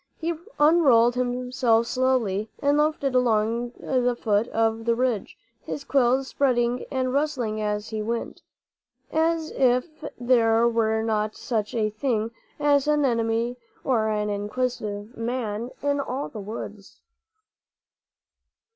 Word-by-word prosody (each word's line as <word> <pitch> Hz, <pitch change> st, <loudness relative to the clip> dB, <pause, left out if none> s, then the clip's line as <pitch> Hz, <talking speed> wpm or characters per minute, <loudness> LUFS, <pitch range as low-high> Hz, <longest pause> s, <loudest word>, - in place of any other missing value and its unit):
He 335 Hz, +1 st, -1 dB, 0.3 s
unrolled 285 Hz, -7 st, +5 dB
himself 250 Hz, -1 st, +1 dB
slowly 235 Hz, -5 st, 0 dB
and 285 Hz, +1 st, +2 dB
loafed 305 Hz, 0 st, +1 dB
along 240 Hz, -3 st, +1 dB
the 245 Hz, -2 st, 0 dB
foot 215 Hz, 0 st, +1 dB
of 225 Hz, -1 st, 0 dB
the 235 Hz, 0 st, +2 dB
ridge, 245 Hz, -4 st, -1 dB, 0.3 s
his 285 Hz, -, -5 dB
quills 265 Hz, -1 st, +2 dB
spreading 245 Hz, -3 st, +1 dB
and 255 Hz, -1 st, -1 dB
rustling 255 Hz, -7 st, -1 dB
as 210 Hz, 0 st, -2 dB
he 220 Hz, -1 st, -3 dB
went, 230 Hz, +2 st, -4 dB, 0.7 s
as 320 Hz, 0 st, +1 dB
if 255 Hz, +5 st, +1 dB, 0.2 s
there 235 Hz, -2 st, +4 dB
were 220 Hz, -1 st, +1 dB
not 215 Hz, -1 st, -1 dB
such 220 Hz, -2 st, -3 dB
a 215 Hz, -2 st, +1 dB
thing 225 Hz, -1 st, -1 dB, 0.3 s
as 290 Hz, -1 st, +3 dB
an 300 Hz, -1 st, +3 dB
enemy 230 Hz, 0 st, 0 dB, 0.3 s
or 230 Hz, -5 st, +1 dB
an 210 Hz, -1 st, -1 dB
inquisitive 210 Hz, 0 st, -3 dB
man 230 Hz, -1 st, -3 dB
in 285 Hz, 0 st, +1 dB
all 275 Hz, 0 st, -3 dB
the 220 Hz, -, -8 dB
woods. 205 Hz, -1 st, -8 dB
240 Hz, 125 wpm, -25 LUFS, 220-260 Hz, 0.7 s, unrolled